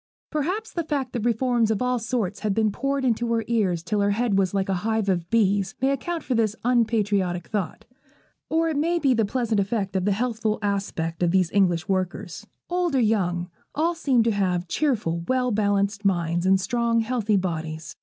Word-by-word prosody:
Perhaps 360 +9 -2
the 340 - -1
fact 280 -5 -2
that 235 -3 -2
reforms 240 -1 +2
of 220 - +1
all 250 0 0
sorts 225 -4 -2
had 210 -3 -1
been 220 -1 +2
poured 275 +4 -1
into 235 -1 +1
her 225 -1 +1
ears 195 -8 +1
till 205 +3 0
her 200 - +2
head 220 +1 +1
was 190 -2 +2
like 195 -1 -1
a 195 - 0
hive 220 -1 0
of 175 -3 -1
bees, 200 -4 +2
may 265 +1 +2
account 330 +5 -3
for 260 - -1
this 220 -3 +1
unpatriotic 210 -7 +1
thought. 200 -7 -3 0.6
Or 330 +1 +2
it 310 - -1
may 335 +4 +1
be 275 -6 +3
the 225 -2 +2
pleasant 230 -1 0
effect 200 -1 -1
of 185 -1 0
the 205 - +2
healthful 220 0 -1
aspect 195 -5 -2
of 175 - +3
these 185 -1 +2
English 180 -4 +2
workers. 190 +1 -3 0.2
Old 350 -4 0
or - - +4
young, 180 -6 0 0.2
all 330 +3 +1
seemed 275 -8 +2
to 230 - +2
have 185 -3 0
cheerful, 205 - 0
well 255 -1 +1
balanced 205 0 +1
minds, 175 -2 +1
in 190 0 +5
strong, 230 +4 +1
healthy 220 -3 +1
bodies. 160 -4 -4
215 Hz, 195 wpm, -24 LUFS, 190-245 Hz, 0.6 s, in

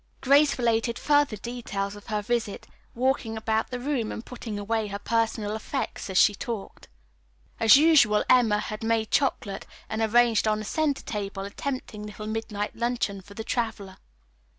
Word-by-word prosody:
Grace 280 +2 +4
related 230 -1 +1
further 290 -5 +2
details 205 -3 -4
of 205 - -13
her 210 -1 -2
visit, 225 -2 -2 0.3
walking 245 -2 0
about 220 0 0
the 250 -1 -4
room 250 -4 -1
and 225 - -6
putting 230 -4 -6
away 215 +1 -1
her 200 0 -4
personal 220 -1 -1
effects 220 -1 -4
as 190 - -1
she 205 - +6
talked. 230 -2 -6 0.7
As 225 +2 +8
usual 280 -9 +5
Emma 235 -5 +5
had 215 0 -5
made 225 -1 0
chocolate 205 -7 0 0.2
and 220 +1 -3
arranged 225 -1 +3
on 215 0 +2
the 215 - -5
center 295 +3 0
table 200 -2 -4
a 200 - -6
tempting 245 -4 -5
little 210 0 -8
midnight 215 -1 -3
luncheon 235 -4 -1
for 200 +2 -15
the 220 - -5
traveler. 220 -5 -3
225 Hz, 165 wpm, -26 LUFS, 210-245 Hz, 0.7 s, As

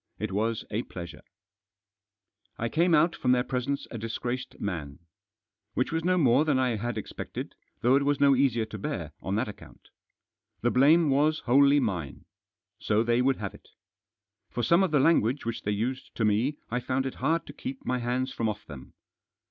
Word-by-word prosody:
It 110 -2 -3
was 110 +3 -1
a 110 +2 0
pleasure! 85 -7 -9 1.4
I 115 - -2
came 170 +4 +3
out 165 +3 +3
from 125 -1 +2
their 125 -1 +2
presence 130 +2 -2
a 115 - -5
disgraced 120 +3 -4
man. 80 -8 -4 0.8
Which 125 - 0
was 165 0 -1
no 180 +1 +2
more 135 -3 +4
than 150 -4 +2
I 130 -3 +1
had 120 +1 -3
expected, 105 - -6 0.3
though 125 +3 +4
it 140 - +1
was 145 0 +1
no 140 -1 +5
easier 125 -4 +2
to 110 -1 -8
bear - - -4
on 95 +2 -2
that 110 +3 0
account. 105 - -12 0.7
The 120 - +2
blame 150 +4 +5
was 150 +3 +2
wholly 140 +3 +5
mine. 90 - -3 0.5
So 110 +1 +1
they 120 +1 +2
would 135 +1 +2
have 100 -2 -5
it. - - -17 0.8
For 120 - -3
some 170 - +4
of 190 - +2
the 150 -2 +3
language 135 -4 +3
which 115 0 -3
they 105 - -2
used 120 +6 -3
to 110 - 0
me 115 +8 +1
I 125 - 0
found 130 +2 -1
it 130 - -3
hard 165 +1 +1
to - - -10
keep 265 +1 -7
my 125 - 0
hands 125 +2 -1
from 115 -1 -1
off 105 0 -6
them. 70 -4 -11
125 Hz, 190 wpm, -28 LUFS, 110-140 Hz, 1.4 s, no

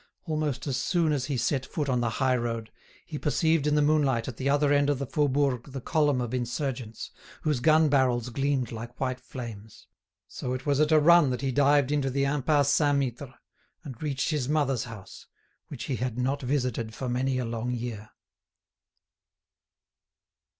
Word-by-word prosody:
Almost 155 -4 -2
as 135 -4 -1
soon 165 +3 +1
as 140 -3 0
he 135 -1 -2
set 130 +2 0
foot 145 +3 -3
on 125 -2 +1
the 120 - +1
high 130 +2 +1
road, 115 -2 -3 0.3
he 150 -3 -6
perceived 160 0 +1
in 150 - +2
the 150 - +3
moonlight 140 -6 +2
at 125 -4 -6
the 135 - -1
other 145 0 +3
end 145 0 +3
of 145 - +1
the 140 - -3
Faubourg 140 -3 +1
the 135 - -4
column 145 -1 +1
of 120 0 -4
insurgents, 125 -2 -3 0.3
whose 150 -4 +1
gun 155 +4 +4
barrels 125 -4 +2
gleamed 135 -1 -1
like 115 +1 -8
white 130 -1 -2
flames. 115 -5 -9 0.4
So 125 - -5
it 130 +1 -5
was 145 -1 +1
at 155 +1 +3
a 155 - +6
run 170 -1 +6
that 125 -1 -2
he 135 -1 -1
dived 145 +1 +3
into 145 -2 +1
the 140 +1 0
Impasse 145 0 +2
Saint 145 -2 +3
Mittre, 130 -1 -3 0.5
and 130 -7 -9
reached 140 -3 -1
his 145 -4 -1
mother's 140 -6 +1
house, 105 -5 -11 0.4
which - - -7
he 130 - -2
had 125 0 -3
not 135 +3 -1
visited 125 -4 -2
for 130 - -4
many 130 +2 0
a 125 - -1
long 115 +1 -3
year. 115 -3 -5
135 Hz, 185 wpm, -27 LUFS, 125-145 Hz, 0.5 s, a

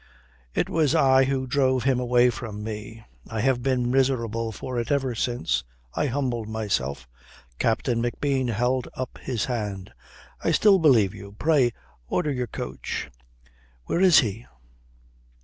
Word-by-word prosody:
"It - - +1
was 155 -4 +1
I 130 0 +5
who 135 -1 -1
drove 130 -1 +1
him 130 -1 +2
away 125 0 +3
from 110 -3 -7
me. 110 +1 -7 0.2
I 110 -1 -2
have 130 0 +2
been 125 -2 0
miserable 115 -4 +1
for 125 +3 -4
it 120 - -3
ever 135 -3 +1
since. 105 - -1 0.3
I 150 - 0
humbled 120 -4 -2
myself." 70 - -2 0.5
Captain 115 +1 +1
McBean 130 +1 -1
held 125 +3 0
up 130 -1 -5
his 120 -4 -2
hand. 105 -6 -4 0.5
"I - - +2
still 200 -3 +5
believe 120 - +4
you. 100 +1 -11
Pray, 145 -6 +3 0.4
order 150 - 0
your 125 -2 -2
coach." 65 - -5 0.7
"Where 170 - 0
is 185 -5 +7
he?" 115 0 -4
120 Hz, 145 wpm, -25 LUFS, 110-130 Hz, 0.7 s, is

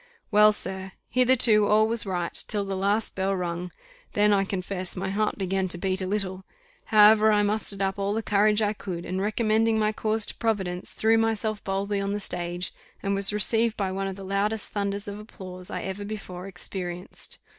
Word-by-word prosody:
Well, 210 0 +7
sir, 190 -2 -5 0.2
hitherto 245 -4 +5
all 215 +1 +4
was 225 -2 -1
right, 175 -3 -2
till 205 -2 -1
the 195 0 -3
last 200 +3 +1
bell 195 +1 0
rung; 175 0 -3 0.4
then, 210 0 +4
I 195 -1 +2
confess, 185 -1 -4
my 190 +1 -3
heart 215 +2 0
began 190 0 -1
to 175 - -3
beat 190 +1 0
a 185 - -2
little: 190 -2 -2 0.4
however, 215 0 +6
I 210 -1 +3
mustered 205 -1 +1
up 195 +1 -1
all 200 +1 0
the 225 - -2
courage 210 +1 +3
I 210 0 +1
could, 180 -5 -6
and 185 +1 -2
recommending 220 +1 +2
my 215 0 +2
cause 215 0 0
to - - -5
Providence, 190 -6 -2
threw 225 +1 +3
myself 220 -1 -1
boldly 200 +1 -1
on 200 0 -2
the 205 - -2
stage, 175 -2 -3 0.3
and 200 0 0
was 195 0 +1
received 220 +2 +1
by 195 -2 -1
one 195 +1 -2
of 190 - -4
the 195 0 -9
loudest 205 +3 -1
thunders 200 0 -2
of 205 0 -6
applause 185 -3 -9
I - - -4
ever 190 +1 -4
before 195 -3 -7
experienced. 180 -1 -6
200 Hz, 195 wpm, -26 LUFS, 190-215 Hz, 0.4 s, Well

